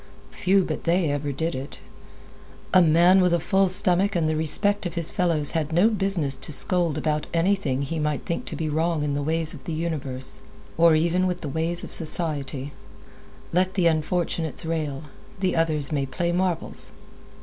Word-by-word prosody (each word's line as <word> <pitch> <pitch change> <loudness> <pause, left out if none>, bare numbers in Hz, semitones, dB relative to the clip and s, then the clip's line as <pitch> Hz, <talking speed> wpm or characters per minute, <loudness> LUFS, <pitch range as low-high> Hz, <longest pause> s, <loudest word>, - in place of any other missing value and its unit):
Few 190 +1 +2
but - - -5
they 170 -2 +1
ever 145 0 -2
did 160 +5 -3
it. 130 +2 -7 1.0
A 185 - +7
man 175 +3 +5
with 180 -1 +3
a - - 0
full 190 +3 +1
stomach 185 +1 +3
and 165 -2 +1
the 155 - 0
respect 195 +6 +1
of 170 - -9
his 170 -1 +2
fellows 165 -5 +1
had 160 -1 -2
no 175 +7 +4
business 195 -9 0
to 135 +3 -4
scold 170 +1 +2
about 150 -1 -2
anything 165 -6 0
that 140 - -4
he 165 - -3
might 150 -2 -2
think 170 - -3
to - - -5
be 160 - -3
wrong 160 +1 -1
in 145 -1 -1
the 145 - -2
ways 160 +2 0
of - - -12
the 165 - -4
universe, 145 -5 -4 0.4
or 165 -1 +5
even 170 +4 +1
with 180 -1 -3
the 150 - -5
ways 165 +4 -1
of - - -5
society. 145 -4 +1 0.8
Let 185 +1 +1
the 185 -3 +1
unfortunates 165 0 -1
rail; 155 -3 -3 0.4
the 185 -1 0
others 155 -3 +1
may 140 -2 -1
play 170 +6 -2
marbles. 180 -1 0
165 Hz, 185 wpm, -24 LUFS, 150-180 Hz, 1.0 s, A